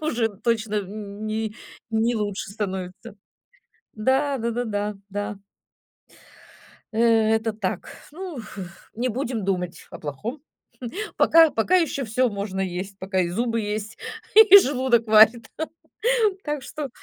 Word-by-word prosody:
уже 245 -8 0
точно 220 +1 -1
н 205 +1 -5
не 215 0 -2 0.4
не 225 +2 +1
лучше 205 -2 -3
становится. 190 -2 -5 0.8
Да, 265 +5 +1
да-да-да, 225 -3 -2
да. 205 0 -4 1.6
Э, - - -4 0.4
это 220 0 -1
так. 195 -4 -3 0.2
Ну, 355 -1 -7 0.6
не 250 +2 -1
будем 240 -2 -3
думать 180 -3 -3
о - - -9
плохом. 210 - -6 0.7
Пока, 325 -2 +6
пока 245 +12 +2
ещё 325 -6 +1
всё 250 +2 +1
можно 200 -2 -4
есть, 190 +1 -3
пока 190 -1 -2
и 175 -2 +1
зубы 230 +4 -1
есть, 210 0 -4 0.4
и 425 -2 +10
желудок 260 - +3
варит. 220 +2 +6 1.0
Так 295 -2 -3
что 290 +1 -6
220 Hz, 120 wpm, -24 LUFS, 205-255 Hz, 1.6 s, и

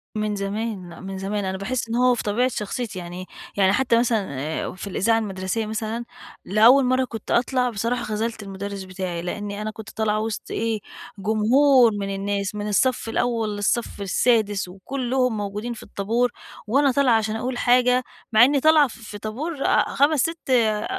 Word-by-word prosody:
من 215 -1 -1
زمان 200 -2 -3
لأ، 170 - -11
من 190 0 -6
زمان، 200 +1 -2
أنا 190 0 -2
باحس 230 +3 -3
إن 230 - -1
هو 250 0 +4
في - - -4
طبيعة 225 +5 +1
شخصيتي 215 -3 -4
يعني 180 +1 -7 0.3
يعني 195 -1 +4
حتى 235 -1 +3
مثلًا 225 -5 +1
آآ 155 +3 -3
في 195 - -7
الإذاعة 225 +4 +2
المدرسية 195 +1 -3
مثلًا، 220 +2 -3 0.4
لأول 235 +7 +6
مرّة 255 +1 +2
كنت 225 -3 -7
أطلع 250 +1 +2
بصراحة 230 +2 -2
خَذلت 220 0 -3
المدرس 195 0 -6
بتاعي، 185 -2 -4
لأن 205 +3 -4
أنا 210 +1 -4
كنت 220 -1 -10
طالعة 215 -1 0
وسط 220 0 -4
إيه، 225 -1 -1 0.4
جمهور 235 +5 +4
من 195 -1 -3
الناس 200 0 -2
من 210 0 -3
الصف 230 +2 +1
الأول 225 -3 0
للصف 205 +1 -1
السادس، 205 -1 +1
وكلّهم 250 +4 -1
موجودين 210 +4 -4
في 225 - -10
الطابور، 235 +5 0 0.4
وأنا 275 +5 +3
طالعة 260 -2 +3
عشان 220 0 -1
أقول 245 +2 -3
حاجة، 250 +1 +3 0.3
مع 220 +2 +8
إنّي 280 +1 +2
طالعة 310 -1 +5
ف - - -11
في 215 -2 -9
طابور، 270 +9 -4
آآ، - - +3
5، 285 +2 +3
6 330 -3 -3
أ 220 -4 +3
220 Hz, 175 wpm, -23 LUFS, 200-245 Hz, 0.4 s, مع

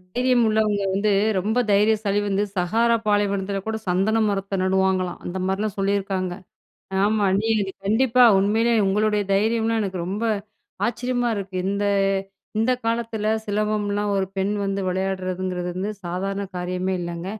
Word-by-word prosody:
தைரியம் 250 -1 +3
உள்ளவங்க 215 -2 +1
வந்து, 205 +2 +1 0.3
ரொம்ப 220 +6 0
தைரியசாலி 205 0 +2
வந்து 200 +1 +1
சகாரா 230 +6 +2
பாலைவனத்தில 200 -1 0
கூட 220 0 -1
சந்தன 200 +5 +2
மரத்தை 195 0 -2
நடுவாங்களாம், 190 -1 +1
அந்த 180 +2 -4
மாதிரிலாம் 200 +1 -2
சொல்லியிருக்காங்க. 195 -2 -1 0.7
ஆமா 210 0 +2 0.2
நீங்க 215 -3 0
கண்டிப்பா 245 +4 +4
உண்மையிலே 225 +4 +2
உங்களுடைய 210 +1 +2
தைரியம்லாம் 225 +2 +1
எனக்கு 190 -2 -3
ரொம்ப 205 +4 -3 0.6
ஆச்சரியமா 245 +1 -1
இருக்கு. 195 -1 -5
இந்த 200 +1 -1 0.7
இந்த 240 +3 +3
காலத்தில 225 -2 -1 0.2
சிலம்பம்லாம் 205 0 -1
ஒரு 190 -1 0
பெண் 195 +2 0
வந்து 195 0 -1
விளையாடுறதுங்கிறது 185 -1 -2
வந்து 195 +3 -2
சாதாரண 195 +3 -3
காரியமே 180 +1 -2
இல்லங்க. 170 0 -5
200 Hz, 130 wpm, -23 LUFS, 190-220 Hz, 0.7 s, கண்டிப்பா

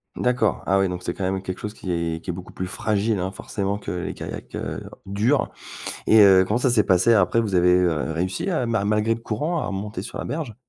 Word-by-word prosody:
D'accord, 125 -3 +1
ah 95 - +4
oui 95 -1 +2
donc 90 0 -4
c'est 85 - -3
quand 95 - -4
même 95 +1 -1
quelque 95 -1 -5
chose 105 0 -6
qui 95 - -5
est 85 -1 -2
qui - - -8
est 90 - 0
beaucoup 90 +1 -9
plus 95 - -4
fragile 110 +1 0
hein 95 +1 -2
forcément 100 0 -3
que - - -7
les 90 -1 -3
kayaks, - - -8
heu, - - -4 0.2
durs. 110 +8 +1 0.6
Et 110 0 +7
heu, 95 -2 +7
comment 105 +3 +1
ça 130 - +2
s'est 115 -4 +3
passé 95 +6 +4
après? 100 +2 +3
Vous 105 -4 -2
avez, 90 0 +5
heu, 80 -3 +1
réussi, 90 - -2
heu, 155 -9 0
ma 115 -3 0
malgré 105 +2 +2
le 115 - -8
courant, 150 +11 -1
à - - -3
remonter 100 0 -4
sur 110 - -7
la - - -3
berge? 150 -8 -4
100 Hz, 245 wpm, -23 LUFS, 90-115 Hz, 0.6 s, Et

